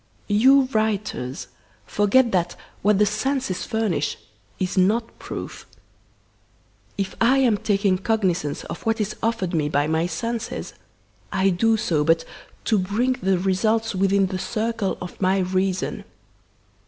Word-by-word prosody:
You 260 +7 +6
writers 210 - -1 0.4
forget 230 - +3
that 175 -2 0 0.3
what 205 0 +3
the 210 - +4
senses 215 -1 -1
furnish 220 -5 -1 0.4
is 185 -2 -2
not 215 +5 +1
proof. - - -7 1.3
If 195 -1 -2
I 245 +4 +5
am 250 -5 +4
taking 195 -3 +1
cognisance 185 -8 0
of - - -7
what 225 0 0
is 210 0 -2
offered 220 -6 -1
me 150 -3 +1
by 145 0 +1
my 160 +2 0
senses 230 +7 -4 0.6
I 190 0 +2
do 225 +5 +2
so 160 -8 +1
but 165 +1 +2 0.4
to 215 - +3
bring 210 +8 +1
the 190 0 +2
results 215 +5 +1
within 195 +1 +2
the 185 0 -3
circle 220 -1 -2
of 180 +2 -8
my 190 0 +3
reason. 185 0 -1
200 Hz, 135 wpm, -23 LUFS, 185-225 Hz, 1.3 s, You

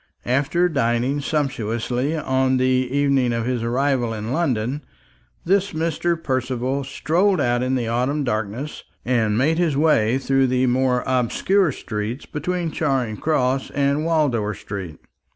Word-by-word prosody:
After 140 +8 +2
dining 135 -2 0
sumptuously 130 -1 -1
on 130 -2 +1
the 130 - +2
evening 130 0 +2
of 115 -1 -1
his 125 -2 -1
arrival 120 -1 0
in 110 +2 -5
London, 135 -3 -1 0.6
this 200 +2 +1
Mr. 165 +2 0
Percival 130 -2 -2
strolled 170 +8 +1
out 120 -2 +1
in 130 +1 0
the 120 -3 -1
autumn 125 +6 0
darkness, 110 +4 -3 0.2
and 110 -4 +1
made 155 +7 +2
his 160 -6 +1
way 130 -6 +3
through 135 0 +2
the 130 0 +1
more 125 0 +1
obscure 140 - +2
streets 110 +1 -5
between 170 +2 -3
Charing 130 -9 -1
Cross 135 -3 0
and 140 +1 +1
Wardour 135 -11 +1
street. 95 -6 -7
130 Hz, 135 wpm, -22 LUFS, 120-150 Hz, 0.6 s, way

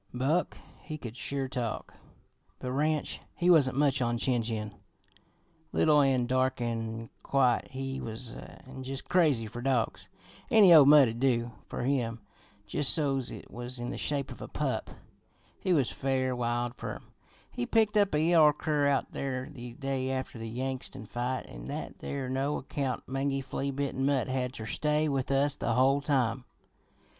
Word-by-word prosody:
"Buck, 145 +8 0 0.2
he 155 - -6
could 120 -5 -8
sure 135 +1 -3
talk, 125 -3 -4 0.6
but 125 - -5
Ranch, 150 +3 0 0.2
he 180 +1 +3
wasn't 135 -6 +4
much 140 -2 +2
on 120 -1 +1
chin 120 0 +1
chin. 110 -2 -3 1.0
Little 150 -2 +4
an' 130 -3 +3
dark 130 +1 +1
an' 115 -1 -3
quiet 130 -3 +2
he 135 0 -4
was, 115 +1 -6
an' 130 0 -10
jus' 135 +1 -4
crazy 150 -11 +2
fer 115 +3 -7
dogs. 115 -7 -1 0.4
Any 205 -5 +8
old 150 -4 +9
mutt'd 135 -6 +6
do 120 -3 +1 0.2
fer - - -4
him 120 -4 0 0.5
jus' 140 +7 -1
so's 135 -5 +1
it - - -10
was 120 +1 -6
in 120 0 -4
the - - -4
shape 140 -2 -1
of - - -10
a - - -6
pup. - - -2 0.7
He 185 - -1
was 145 -8 +3
fair 130 -1 0
wild 120 0 -1
fer - - -6
'em. - - -14 0.4
He 120 - -3
picked 220 -2 +3
up 200 -6 +3
a - - +3
yeller 160 -3 +6
cur 150 -1 0
out 140 -1 +1
there 130 -2 -3
the 120 -4 -8
day 135 -1 -2
after 130 -3 -3
the 115 0 -5
Yangtsin 130 0 -4
fight, 125 +4 -3
an' - - -10
that - - -6
there 140 -2 -4
no 135 +3 -1
account, 135 -1 -3
mangy, 135 +1 -1
flea 135 +1 -3
bitten 140 -1 -2
mutt 135 -3 +1
had 130 -1 -1
ter 110 - -6
stay 150 +6 +1
with 135 -3 -1
us 140 +1 +2
the 115 - -1
whole 135 +3 +3
time. 130 -4 +1
130 Hz, 170 wpm, -30 LUFS, 120-140 Hz, 1.0 s, old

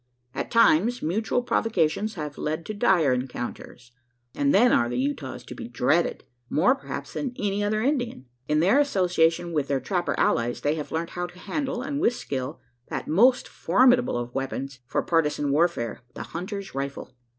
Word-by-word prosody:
At - - -4
times, 230 +1 +4
mutual 220 +8 0
provocations 215 -3 0
have 150 -4 -6
led 155 +2 -2
to 215 - -4
dire 190 - +3
encounters; 125 -1 -6 0.4
and 280 0 +1
then 245 -3 +5
are 120 - +3
the 120 - -2
Utahs 140 +3 -3
to - - -9
be - - -7
dreaded - - +1 0.3
more, 190 +12 +4
perhaps, 270 - -7
than 260 -4 -3
any 205 0 -1
other 215 +1 0
Indians. 245 - -1 0.2
In 150 +1 +2
their 195 - +4
association 175 - +2
with 145 -3 0
their 140 -1 0
trapper 175 +3 -1
allies, 120 +1 +1
they 145 - +1
have 155 -2 -5
learnt 165 +2 -2
how 175 0 -3
to 175 +1 -16
handle 265 +4 -3
and 280 +1 -3
with 240 - +3
skill 135 - -4 0.3
that - - -5
most 240 +11 +4
formidable 245 - +3
of 120 0 -5
weapons, 135 0 -4
for - - -1
partisan 150 -3 +1
warfare 145 -8 0
the - - -5
hunter's 195 +3 -6
rifle. 135 -1 -5
170 Hz, 175 wpm, -25 LUFS, 145-225 Hz, 0.4 s, then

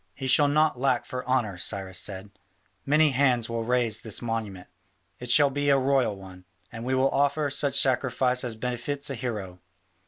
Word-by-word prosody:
"He 135 - -6
shall 145 +3 +4
not 150 -2 +2
lack 135 +1 +1
for 125 0 -5
honour," 115 -8 0
Cyrus 95 -1 -1
said; 100 0 -6 0.6
"many 150 +1 +4
hands 125 -3 +2
will 115 -1 -3
raise 120 -2 +1
his 110 -2 -5
monument: 110 -6 -5 0.5
it 125 - -8
shall 140 +2 +5
be 145 +1 -1
a 140 - +5
royal 135 -5 +1
one; 95 -1 -13 0.3
and 115 0 -8
we 130 +2 -1
will 130 +1 +2
offer 145 +1 +1
such 140 0 0
sacrifice 125 -1 +1
as 120 -3 -3
befits 125 +5 -4
a - - -2
hero. 105 -7 -5
125 Hz, 180 wpm, -26 LUFS, 110-140 Hz, 0.6 s, shall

